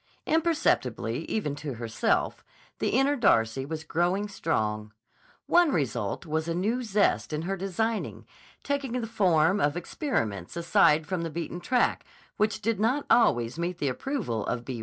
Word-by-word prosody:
Imperceptibly 325 0 +1
even 175 -10 -2
to 145 -4 -5
herself, 115 -1 -1 0.4
the - - 0
inner 270 +4 +3
Darcy 135 - +2
was 160 0 -5
growing 175 +6 0
strong. 110 - -2 0.5
One 350 -3 +4
result 120 - -2
was 160 0 -2
a 165 - -1
new 220 +8 0
zest 210 -7 +1
in 155 +1 -2
her 195 +3 -2
designing, 210 +4 -2 0.4
taking 280 -3 -2
the 235 - -3
form 190 -4 +2
of 145 -2 +1
experiments 115 - -3
aside 170 -3 +4
from 180 +2 -2
the 165 - -3
beaten 170 +2 -5
track 245 +7 +1 0.3
which 215 0 0
did 225 -3 0
not 250 +7 +1
always 120 - +3
meet 175 +1 -2
the 145 -4 0
approval 125 - -3
of 120 -1 -2
B. 125 -2 -5
175 Hz, 155 wpm, -27 LUFS, 145-225 Hz, 0.5 s, One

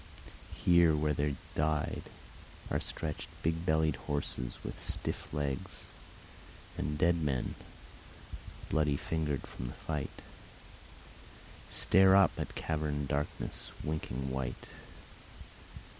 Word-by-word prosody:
Here 85 -2 +7
where 75 0 +2
they 70 0 +1 0.2
died 75 -1 +1 0.7
Are - - +2
stretched 75 -2 -4
big 80 +2 0
bellied 80 -2 +3
horses 65 -4 -3
with - - -5
stiff - - -1
legs; 70 -3 -3 0.8
And 75 +1 -1
dead 85 +1 +4
men, 70 -5 0 1.1
bloody 75 -2 +2
fingered 75 -4 -1
from 60 - -6
the - - -5
fight, 75 -3 -4 1.5
Stare 95 +1 +6
up 100 -2 +7
at - - -3
caverned 75 -3 -1
darkness 75 +1 -2
winking 65 -4 -2
white. 65 -1 -3
75 Hz, 100 wpm, -33 LUFS, 70-80 Hz, 1.5 s, Here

